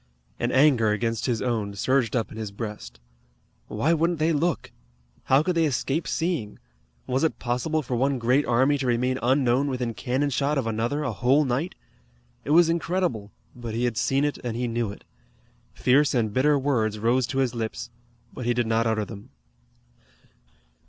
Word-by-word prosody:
An 120 +1 0
anger 130 -5 +4
against 115 +2 -1
his 120 -3 -1
own 110 -5 -2
surged 130 +2 +1
up 115 -3 -1
in - - -9
his 110 -2 -5
breast. 100 - -7 0.7
Why 115 +10 +1
wouldn't 165 +1 +1
they 160 +2 +1
look? 165 +3 -1 0.5
How 135 +3 +4
could 180 - 0
they 165 -1 +2
escape 145 +3 -1
seeing? 165 - -2 0.5
Was 130 +3 -1
it 160 - +1
possible 130 +6 -1
for 125 -1 -3
one 135 +3 +1
great 125 +4 +2
army 130 +4 +3
to 130 - -2
remain 125 +2 +1
unknown 130 +1 +2
within 125 -3 -2
cannon 135 +5 -1
shot 140 +3 0
of 135 - 0
another 115 +6 -1
a 125 - -1
whole 130 +8 +3
night? 135 +8 -2 0.7
It - - -8
was 165 +2 +6
incredible, 165 - -1 0.2
but 120 -2 -6
he 120 - -1
had 120 -2 0
seen 135 +4 +1
it, 145 - -2
and 120 -2 -3
he 125 0 -1
knew 115 -2 -2
it. 100 - -12 0.7
Fierce 140 +3 +3
and 110 -4 0
bitter 145 +4 +3
words 120 -6 0
rose 120 +3 +1
to 135 - -4
his 130 -3 +1
lips, 115 0 -5 0.4
but 125 - -5
he 120 - +2
did 120 -1 +1
not 115 +1 +1
utter 110 -1 0
them. 100 -1 -11
125 Hz, 180 wpm, -25 LUFS, 115-145 Hz, 0.7 s, was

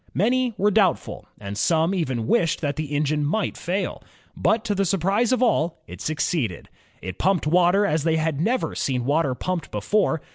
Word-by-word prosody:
Many 245 +3 +1
were 205 +2 +2
doubtful, 185 - +1
and 100 -1 -6
some 165 - +2
even 130 - -1
wished 170 - +1
that 145 -2 -1
the 155 - -3
engine 150 +1 0
might 185 +9 0
faiL 185 +3 -3 0.3
But 225 +1 +1
to 210 - 0
the 195 0 +1
surprise 195 +5 +1
of 255 0 +2
all 170 -8 +1
it - - -10
suc 155 0 -2
ceeded. 125 - -1 0.4
It 95 -1 -6
pumped 190 -2 +1
water 180 +5 +4
as 155 -6 0
they 160 0 +2
had 155 -2 -1
never 240 +8 0
seen 125 -3 -1
water 145 -1 +1
pumped 180 +4 -3
before. 200 -7 0
170 Hz, 185 wpm, -23 LUFS, 150-200 Hz, 0.4 s, water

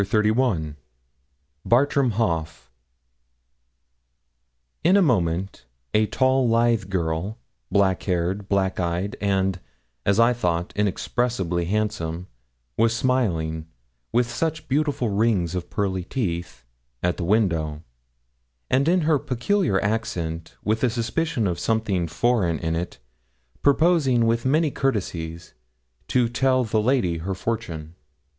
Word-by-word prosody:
CHAPTER 105 +2 +1
XXXI 90 - 0 0.9
BARTRAM 140 +1 +3
HAUGH 80 - -2 2.1
In 185 +4 +5
a - - +5
moment 95 - 0 0.3
a 110 0 +3
tall, 130 0 +2
lithe 115 -4 +2
girl, 90 +3 -2 0.3
black 95 -2 +2
haired, 95 +2 -1
black 95 -2 +1
eyed, 90 +3 -1
and, 95 -2 +1 0.4
as 100 - +2
I 115 +1 +5
thought, 85 -7 -1
inexpressibly 100 -3 -1
handsome, 90 -4 -2 0.5
was 115 +1 +3
smiling, 85 -12 0 0.4
with 120 +1 +2
such 155 +6 -2
beautiful 140 -3 0
rings 100 -5 +1
of 90 -2 -4
pearly 95 -3 -1
teeth, 85 - -3 0.4
at 90 0 +1
the - - -3
window; 85 -6 +1 0.9
and 135 +3 +3
in 180 +2 +3
her 155 -2 +2
peculiar 130 - 0
accent, 85 -7 -3
with 110 +3 0
a 125 - +4
suspicion 120 +2 -1
of 90 -3 -1
something 105 -6 0
foreign 90 -1 +1
in 80 0 -2
it, 85 +2 -4 0.6
proposing 140 -5 +3
with 115 +1 +1
many 155 +2 +2
courtesies 85 -11 -3 0.5
to 125 -2 +2
tell 130 +2 +2
the 110 -1 0
lady 105 -9 +1
her 95 +4 -3
fortune. 90 -8 -4
105 Hz, 120 wpm, -24 LUFS, 85-125 Hz, 2.1 s, In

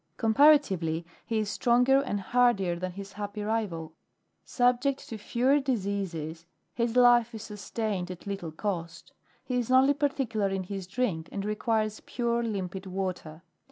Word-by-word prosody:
Comparatively, 220 - +4 0.2
he 225 - 0
is 215 -1 0
stronger 250 +5 +4
and 205 -7 -2
hardier 200 -4 +2
than 180 +1 -4
his 195 +1 -8
happy 205 0 -5
rival. 195 -8 -2 0.5
Subject 250 +2 +1
to 225 - -5
fewer 255 +7 +2
diseases, 190 - -3 0.3
his 235 0 -1
life 240 -1 +5
is 220 - -7
sustained 210 -2 -4
at 180 -1 -8
little 195 -5 -4
cost. 170 -1 -5 0.3
He 250 - -2
is 240 - -3
only 260 +2 +5
particular 265 -8 0
in 195 -1 -2
his 190 0 -6
drink, 190 -7 -2
and 200 -1 -4
requires 215 0 0
pure, 235 -1 -1
limpid 195 -4 -4
water. 180 -4 -4
210 Hz, 145 wpm, -28 LUFS, 185-240 Hz, 0.5 s, life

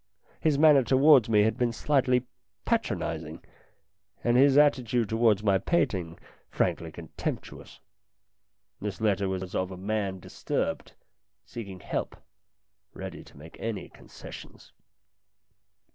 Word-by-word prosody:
His 155 -3 +2
manner 150 -2 +6
towards 135 -1 +5
me 105 -2 +5
had 110 0 0
been 120 -1 +1
slightly 130 0 +1 0.4
patron - - 0
izing, - - -5 0.8
and 120 0 +2
his 135 +2 +5
attitude 125 -6 +3
towards 110 -2 +2
my 100 -2 +3
painting 95 - -1 0.3
frankly 80 -1 -1
contemptuous. 80 -1 -7 1.0
This 100 -2 -5
letter 100 -3 +1
was 95 -1 -4
of 95 0 -1
a 95 - -8
man 100 -1 -2
disturbed, - - -3 0.5
seeking 105 -5 -8
help, - - -4 0.8
ready - - -7
to - - -18
make 80 +3 -13
any 110 -4 -4
concessions. - - -13
110 Hz, 115 wpm, -28 LUFS, 95-130 Hz, 1.0 s, manner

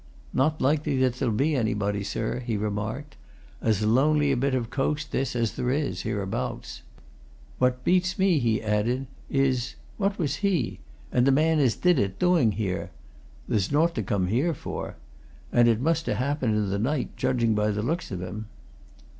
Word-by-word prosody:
"Not 155 +4 +2
likely 145 +1 +1
that 130 -1 +2
there'll 125 -2 0
be 145 +6 +2
anybody, 105 -4 0
sir," 110 +4 -2
he 120 -3 -2
remarked. 105 +8 -4 0.4
"As 110 -2 +1
lonely 145 +6 +3
a - - +2
bit 135 +2 +1
of 120 -2 -2
coast, 145 +2 -1
this, 135 -2 -1
as 115 -2 +1
there 125 - -2
is, 135 -9 -1
hereabouts. 100 -2 -3 0.8
What 125 0 +1
beats 185 +1 +2
me," 190 -5 +3
he 115 -3 +1
added, 110 +5 0 0.2
"is 130 -3 +1 0.2
what 200 -1 0
was 150 -5 -1
he 185 - 0 0.3
and 125 +1 +3
the - - +6
man 155 +3 +3
as 130 -6 +3
did 180 -5 +3
it 95 -1 -1
doing, 170 - +3
here? 95 -2 -2 0.6
There's 100 0 0
naught 165 +4 +3
to 115 - -2
come 95 -2 0
here 135 - +1
for. - - -6 0.6
And 120 -1 +5
it 115 -2 +3
must 165 +4 0
ha' - - +1
happened 130 -4 0
in 105 -2 0
the 100 - -1
night, 130 +5 -1
judging 125 -3 +1
by 105 0 +1
the 105 0 -1
looks 165 +9 -2
of 95 -3 -4
him." 105 +4 -6
125 Hz, 180 wpm, -26 LUFS, 110-150 Hz, 0.8 s, the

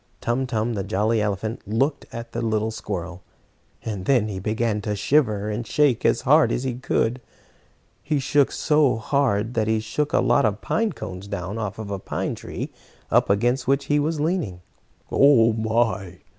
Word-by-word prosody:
Tum 125 +3 -1
Tum, 115 -1 -1
the 100 -3 -2
jolly 110 +3 +1
elephant, 105 +2 -2
looked 135 +8 0
at 115 0 -7
the - - -3
little 110 -1 0
squirrel, 90 -4 -5 0.6
and 100 -4 -4
then 120 -6 +2
he 95 -2 -4
began 110 +1 -1
to 105 0 -2
shiver 105 -2 +1
and 110 +2 -4
shake 145 -6 +2
as - - +3
hard - - +4
as 125 - -1
he 130 -2 -1
could. 125 0 -1 0.8
He 150 0 -1
shook 140 +1 +2
so 150 -4 +2
hard 115 -2 0
that 110 -2 0
he 110 0 +2
shook 125 +7 -2
a - - +3
lot 140 - +3
of 105 -1 +1
pine 220 - 0
cones 95 -6 -7
down 100 +1 -4
off 105 -2 -4
a 100 -3 -5
pine - - -3
tree - - -6 0.4
up - - +3
against 120 +6 +1
which 140 +1 +2
he 150 - +4
was 155 +1 -1
leaning. 150 - -1 0.5
"Oh 120 -5 +5
my! 110 -5 0
110 Hz, 175 wpm, -23 LUFS, 105-135 Hz, 0.8 s, Oh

